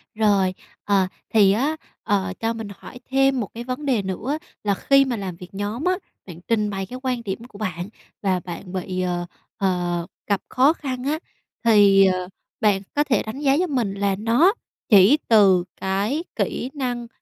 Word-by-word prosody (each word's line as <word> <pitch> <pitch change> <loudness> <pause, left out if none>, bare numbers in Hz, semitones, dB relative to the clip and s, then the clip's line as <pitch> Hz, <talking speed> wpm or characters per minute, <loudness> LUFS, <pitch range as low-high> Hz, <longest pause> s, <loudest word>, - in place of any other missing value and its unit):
Rồi, 200 -4 +3 0.3
ờ, 195 -2 +2 0.2
thì 205 -3 +5
á, 270 +10 +1 0.3
ờ, 195 -2 0
cho 225 0 0
mình 225 -2 -6
hỏi 250 - -11
thêm 270 0 +3
một 215 - -2
cái 235 - -6
vấn 255 +4 -4
đề 255 -7 +2
nữa 205 - -3 0.3
là 205 -1 +2
khi 275 +6 +4
mà 250 - -1
làm 195 -5 -5
việc 180 +1 -11
nhóm 205 +7 -3
á, 365 0 +2 0.3
bạn 170 -3 -10
trình 215 -2 +1
bày 195 -1 -3
cái 255 +6 -8
quan 250 -3 -1
điểm 195 -2 -3
của 205 - -14
bạn 185 -3 -4 0.3
và 190 -3 +1
bạn 180 +1 -8
bị, 185 0 -3
ờ, 175 -1 -1 0.3
ờ, 175 -3 0 0.2
gặp 200 -3 +1
khó 270 +5 +4
khăn 260 -6 -5
á, 300 +3 -1 0.5
thì, 200 -3 +6
ờ, 185 -1 0 0.3
bạn 205 -3 +3
có 295 - +3
thể 285 -5 +1
đánh 220 +5 -6
giá 275 -2 +3
giúp 350 +5 +1
mình 235 -8 0
là 200 -1 0
nó 240 - +4 0.4
chỉ 205 +7 +7
từ 195 -5 +5 0.2
cái 205 - 0
kỹ 250 - -2
năng 245 -4 -3
210 Hz, 190 wpm, -23 LUFS, 190-255 Hz, 0.5 s, chỉ